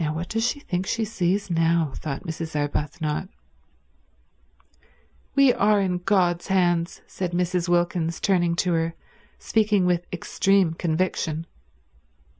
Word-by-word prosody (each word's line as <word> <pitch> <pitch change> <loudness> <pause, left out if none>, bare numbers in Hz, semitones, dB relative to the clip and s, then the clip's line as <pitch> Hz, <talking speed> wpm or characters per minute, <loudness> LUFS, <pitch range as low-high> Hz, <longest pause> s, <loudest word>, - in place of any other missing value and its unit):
"Now 150 0 -1
what 170 +3 -4
does 225 0 -1
she 245 +4 0
think 185 -8 -3
she 225 -1 0
sees 200 -1 -1
now?" 165 -3 +2
thought 140 0 -5
Mrs. 160 -2 -5
Arbuthnot. 150 +3 -2 2.1
"We 275 -3 +6
are 210 0 +3
in 185 -2 0
God's 175 -2 +1
hands," 175 -3 +1
said 180 -2 -4
Mrs. 180 0 0
Wilkins, 175 -1 +1
turning 175 -3 +2
to 180 - +1
her, 165 0 0 0.4
speaking 210 -4 +2
with 175 -1 +1
extreme 190 0 +1
conviction. 165 -1 -1
175 Hz, 125 wpm, -24 LUFS, 165-195 Hz, 2.1 s, We